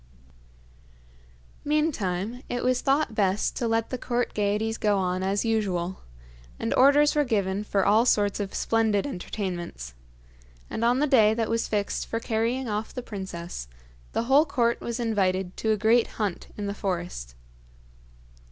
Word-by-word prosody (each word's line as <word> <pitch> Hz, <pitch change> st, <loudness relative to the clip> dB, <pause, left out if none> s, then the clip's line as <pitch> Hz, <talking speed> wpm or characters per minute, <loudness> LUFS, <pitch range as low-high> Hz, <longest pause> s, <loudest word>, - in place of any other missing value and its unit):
Meantime, 245 Hz, -, -1 dB
it 245 Hz, -, -2 dB
was 255 Hz, 0 st, +2 dB
thought 275 Hz, -3 st, +1 dB
best 200 Hz, -1 st, +1 dB
to 235 Hz, -, -1 dB
let 225 Hz, 0 st, 0 dB
the 255 Hz, -, -3 dB
court 245 Hz, 0 st, -1 dB
gaieties 210 Hz, +2 st, 0 dB
go 205 Hz, -1 st, +2 dB
on 185 Hz, -1 st, -1 dB
as 195 Hz, +3 st, 0 dB
usual, 190 Hz, -5 st, -1 dB, 0.6 s
and -, -, -1 dB
orders 285 Hz, +3 st, +5 dB
were 295 Hz, -, +3 dB
given 200 Hz, -5 st, 0 dB
for 200 Hz, -2 st, 0 dB
all 215 Hz, +3 st, +5 dB
sorts 205 Hz, -5 st, +2 dB
of 200 Hz, -2 st, -3 dB
splendid 220 Hz, -3 st, +1 dB
entertainments; 180 Hz, -, -5 dB, 0.8 s
and 225 Hz, -, -2 dB
on 240 Hz, +2 st, +3 dB
the 290 Hz, -, +2 dB
day 220 Hz, -6 st, +5 dB
that 225 Hz, -1 st, -1 dB
was 230 Hz, 0 st, 0 dB
fixed 205 Hz, -2 st, -2 dB
for 230 Hz, -, -2 dB
carrying 230 Hz, +3 st, -1 dB
off 215 Hz, 0 st, -3 dB
the 250 Hz, -, -6 dB
princess, 175 Hz, -, -6 dB, 0.5 s
the -, -, 0 dB
whole 270 Hz, +5 st, +5 dB
court 240 Hz, -4 st, +1 dB
was 235 Hz, +1 st, -4 dB
invited 190 Hz, -5 st, 0 dB
to 220 Hz, -, -2 dB
a 215 Hz, -, +2 dB
great 225 Hz, +3 st, +3 dB
hunt 205 Hz, -5 st, -2 dB
in 205 Hz, -, -3 dB
the 200 Hz, -, -2 dB
forest. 175 Hz, -, -4 dB
215 Hz, 155 wpm, -26 LUFS, 195-240 Hz, 0.8 s, orders